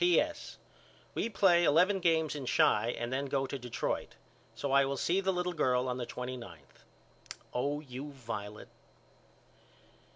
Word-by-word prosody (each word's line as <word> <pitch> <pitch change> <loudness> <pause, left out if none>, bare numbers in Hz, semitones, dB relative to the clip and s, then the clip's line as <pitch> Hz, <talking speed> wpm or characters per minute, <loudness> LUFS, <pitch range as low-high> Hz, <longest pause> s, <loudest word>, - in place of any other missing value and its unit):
P.S. 295 - +1 0.6
We - - -1
play 180 -5 +4
eleven 180 +6 +4
games 160 -3 +2
in 140 -4 -6
Chi 115 - +3
and 120 +2 -3
then 140 +2 -1
go 135 0 0
to 135 +1 -5
Detroit. 125 -1 -3 0.4
So 140 - -3
I 140 0 +6
will 135 0 -2
see 180 +7 +1
the 190 0 +1
little 180 -1 -1
girl 130 -5 +1
on 125 0 -2
the 120 -2 -4
twenty 125 +1 -5
ninth. 85 - -13 0.7
Oh 145 +4 -1
you 140 +1 -7
Violet. 110 -6 -7
140 Hz, 155 wpm, -32 LUFS, 125-170 Hz, 0.7 s, I